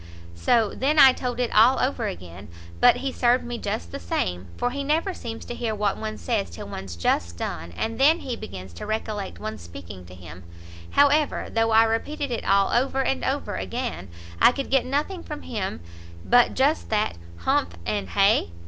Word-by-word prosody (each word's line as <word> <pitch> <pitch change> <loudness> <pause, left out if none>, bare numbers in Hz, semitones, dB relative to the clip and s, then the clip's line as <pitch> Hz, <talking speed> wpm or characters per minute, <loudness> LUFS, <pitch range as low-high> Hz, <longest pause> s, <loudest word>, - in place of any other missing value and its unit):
so 215 - +2
then 290 +4 +1
I 265 -3 +9
told 250 -1 -4
it 245 -2 -1
all 225 +5 +6
over 260 +2 0
again, 90 +3 -8 0.3
but - - +6
he 270 - 0
served 245 0 +2
me 240 -1 -5
just 85 0 -4
the - - -5
same, 90 +1 -2
for 245 - 0
he 280 +2 -3
never 320 +7 0
seems 225 -8 -7
to - - -5
hear 230 -2 -2
what 205 -1 0
one 215 0 -5
says 95 - -1
till 85 - -8
one's 95 -3 -7
just 85 0 0
done, 85 0 -5
and 225 - -3
then 315 +5 +5
he 250 -3 -4
begins 95 - -9
to 85 - -8
recollect 215 -2 -3
one's 215 0 -6
speaking 90 +2 -10
to 90 +1 -12
him; 90 -1 -11 0.5
however, 285 +1 +3
though 225 0 +2
I 225 0 +6
repeated 270 +5 -2
it 235 - -2
all 195 0 +3
over 265 +2 +1
and 265 0 -1
over 260 -8 -2
again, 240 - -4 0.3
I - - +8
could 275 0 -5
get 270 -2 +3
nothing 300 +7 -1
from 300 -2 -7
him 195 - -4 0.4
but 245 0 +4
just 280 +4 +1
that 215 - 0 0.2
humph? 85 0 +1
and 100 -2 -2
hay? 85 -1 +3
225 Hz, 195 wpm, -24 LUFS, -, 0.5 s, I